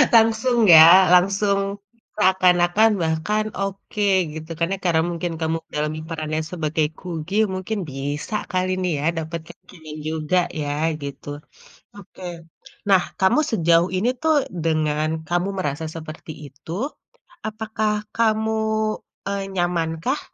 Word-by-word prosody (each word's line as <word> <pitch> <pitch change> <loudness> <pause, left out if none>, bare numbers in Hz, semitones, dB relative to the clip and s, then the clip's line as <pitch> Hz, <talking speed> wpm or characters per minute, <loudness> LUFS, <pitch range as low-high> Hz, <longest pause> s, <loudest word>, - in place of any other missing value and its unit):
Langsung 225 +2 +4
ya? 170 +3 +9
Langsung 195 +2 +3 0.6
seakan-akan 185 +2 +4
bahkan 165 +7 0
oke 195 +1 -3 0.3
gitu, 160 +1 -8
kan 170 - +2
ya. - - -2
Karena 165 -2 +3
mungkin 170 0 -3
kamu 160 0 0 0.2
dalami 150 +1 -2
peran 155 -2 -5
lain 155 0 -1
sebagai 155 -2 0
Kugi, 175 +1 -5 0.2
mungkin 190 +3 -3
bisa 145 +8 -4 0.2
kali 185 0 0
nih 180 -1 0
ya, 145 - -3 0.2
dapet 165 +2 -5
kek 175 +2 -13
keren 160 -4 -10
juga 160 +2 0 0.2
ya, 145 - -3 0.4
gitu, 140 0 -8 0.7
oke, 195 -2 -13 0.7
Nah 190 -2 +5 0.2
kamu 190 +9 +4
sejauh 170 -3 +3
ini 205 +6 +1
tuh, 315 -1 +3 0.3
dengan 155 -1 +1 0.2
kamu 175 +2 0
merasa 150 -3 -2
seperti 155 0 -8 0.2
itu, 140 +4 -13 0.8
apakah 215 0 -2 0.2
kamu, 220 -1 +1 0.7
eee, 200 0 -2
nyamankah 175 - -1
175 Hz, 125 wpm, -22 LUFS, 160-200 Hz, 0.8 s, ya